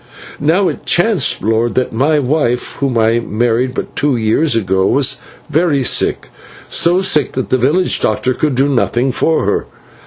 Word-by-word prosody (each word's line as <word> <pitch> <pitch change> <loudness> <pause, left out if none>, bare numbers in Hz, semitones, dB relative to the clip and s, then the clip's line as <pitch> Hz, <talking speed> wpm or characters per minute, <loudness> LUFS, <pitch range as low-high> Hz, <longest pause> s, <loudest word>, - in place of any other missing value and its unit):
"Now 170 +7 +2
it - - -5
chanced, 200 +2 +1
lord, 115 +2 0
that 130 - -1
my 145 +7 +1
wife, 130 -3 -1
whom 135 -4 -1
I 115 +1 +2
married 120 +3 -1
but - - -5
two 145 -2 0
years 115 +5 +1
ago, 95 -3 +1
was 140 -1 +1 0.3
very 155 -3 +1
sick - - 0 0.4
so 175 +3 +2
sick 150 -7 +1
that 130 - -4
the 130 - +3
village 155 +10 +1
doctor 115 +4 0
could 150 0 -1
do 135 +3 +2
nothing 130 -1 0
for 160 +5 0
her. - - -1
130 Hz, 165 wpm, -15 LUFS, 120-155 Hz, 0.4 s, the